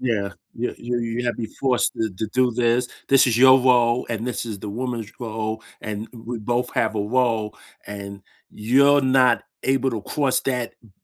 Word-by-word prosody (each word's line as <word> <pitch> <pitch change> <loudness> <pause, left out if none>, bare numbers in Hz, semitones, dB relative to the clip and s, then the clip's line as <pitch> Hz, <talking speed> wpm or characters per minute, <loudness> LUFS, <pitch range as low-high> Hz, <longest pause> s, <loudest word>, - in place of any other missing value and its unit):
Yeah. 105 -6 -1 0.2
You 120 +2 -3
you 120 0 -2
you 115 +1 -3
have 120 - 0
to 120 - -5
be 110 - -4
forced 130 -2 +2
to 110 -1 -2
to 95 +4 -4
do 125 +2 +2
this. 120 +1 +1 0.2
"This 135 -1 +5
is 120 -2 +1
your 130 +1 +8
role, 125 -1 +3
and 115 0 -3
this 125 - -3
is 105 -3 -5
the 105 - -7
woman's 115 0 -4
role, 110 -1 -4 0.2
and 105 +1 -5
w 120 0 -8
we 120 - -3
both 120 +3 -1
have 110 -2 +1
a - - 0
role 110 -1 0 0.3
and 100 -1 -7 0.3
you're 140 +6 +4
not 130 -2 +4 0.2
able 135 0 +1
to 110 -3 -4
cross 140 -3 0
that 125 -3 -2
th 110 - -20
120 Hz, 200 wpm, -22 LUFS, 110-125 Hz, 0.3 s, your